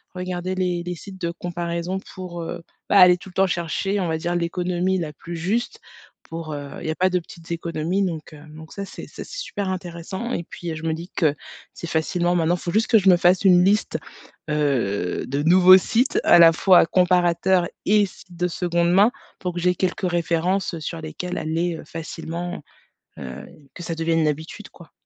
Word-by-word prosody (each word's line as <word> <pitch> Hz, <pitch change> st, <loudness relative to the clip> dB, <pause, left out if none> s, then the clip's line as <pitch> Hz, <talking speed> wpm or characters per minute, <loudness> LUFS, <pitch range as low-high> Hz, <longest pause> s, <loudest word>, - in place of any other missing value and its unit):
regarder 180 Hz, 0 st, -3 dB
les 180 Hz, -2 st, -1 dB
les 180 Hz, 0 st, -3 dB
sites 190 Hz, +3 st, -11 dB
de 170 Hz, -1 st, -1 dB
comparaison 175 Hz, +1 st, -4 dB, 0.2 s
pour, 180 Hz, -2 st, -6 dB
heu, 170 Hz, +1 st, -6 dB, 0.3 s
bah, 205 Hz, -, +4 dB
aller 180 Hz, -1 st, +8 dB
tout 190 Hz, -, -12 dB
le -, -, -16 dB
temps 195 Hz, 0 st, +3 dB
chercher, 180 Hz, +3 st, -1 dB
on 180 Hz, -, -1 dB
va 160 Hz, -, 0 dB
dire 175 Hz, +2 st, -2 dB
l'économie 180 Hz, +2 st, 0 dB
la 155 Hz, -3 st, -4 dB
plus 170 Hz, +3 st, -8 dB
juste. 225 Hz, -, -2 dB, 0.4 s
Pour, 165 Hz, -1 st, -7 dB
heu, 145 Hz, -1 st, -6 dB
il -, -, -5 dB
y -, -, 0 dB
a -, -, -3 dB
pas 185 Hz, +2 st, +2 dB
de 180 Hz, -1 st, +1 dB
petites 170 Hz, -1 st, -13 dB
économies 170 Hz, +3 st, -1 dB
donc, 160 Hz, -3 st, -5 dB
heu, 150 Hz, -, -12 dB
donc 160 Hz, +1 st, -12 dB
ça 200 Hz, -, -5 dB
c'est -, -, -10 dB
ça -, -, -9 dB
c'est -, -, -8 dB
super 205 Hz, -, -4 dB
intéressant 185 Hz, +5 st, -5 dB
et -, -, -2 dB
puis 170 Hz, -1 st, -6 dB
je 155 Hz, -, -8 dB
me 160 Hz, -1 st, 0 dB
dis 170 Hz, +3 st, -7 dB
que 155 Hz, -5 st, +2 dB, 0.4 s
c'est 170 Hz, -, -7 dB
facilement 175 Hz, +2 st, 0 dB
maintenant 170 Hz, 0 st, +2 dB
faut 175 Hz, -, -4 dB
juste 220 Hz, +4 st, +2 dB
que 225 Hz, -3 st, +5 dB
je 195 Hz, -1 st, +4 dB
me 180 Hz, -, +8 dB
fasse 180 Hz, +2 st, +3 dB
une 180 Hz, -2 st, +6 dB
liste, 205 Hz, +3 st, +2 dB, 0.5 s
heu, 120 Hz, -12 st, 0 dB
de 140 Hz, +2 st, -1 dB
nouveaux 185 Hz, +3 st, +8 dB
sites 235 Hz, +7 st, +1 dB
à -, -, +7 dB
la 165 Hz, -1 st, +9 dB
fois 180 Hz, +2 st, +5 dB
comparateurs 180 Hz, 0 st, +2 dB, 0.2 s
et 210 Hz, 0 st, +4 dB
sites 185 Hz, -2 st, -14 dB
de 180 Hz, +1 st, +1 dB
seconde 170 Hz, -1 st, 0 dB
main 200 Hz, +6 st, +5 dB, 0.3 s
pour 180 Hz, -1 st, -3 dB
que 175 Hz, -, -4 dB
j'aie 180 Hz, +1 st, +2 dB
quelques 185 Hz, +1 st, -1 dB
références, 175 Hz, +3 st, 0 dB
heu, -, -, -6 dB
sur 165 Hz, +2 st, -5 dB
lesquelles 180 Hz, +3 st, -5 dB
aller, 165 Hz, +2 st, -1 dB
heu, -, -, -10 dB
facilement, 165 Hz, +2 st, -6 dB, 0.6 s
heu, -, -, -8 dB, 0.3 s
que 175 Hz, -, -8 dB
ça 165 Hz, -, -3 dB
devienne 165 Hz, 0 st, 0 dB
une 155 Hz, -, +3 dB
habitude 160 Hz, +8 st, -5 dB
quoi. 170 Hz, -4 st, -16 dB
175 Hz, 210 wpm, -23 LUFS, 165-185 Hz, 0.6 s, la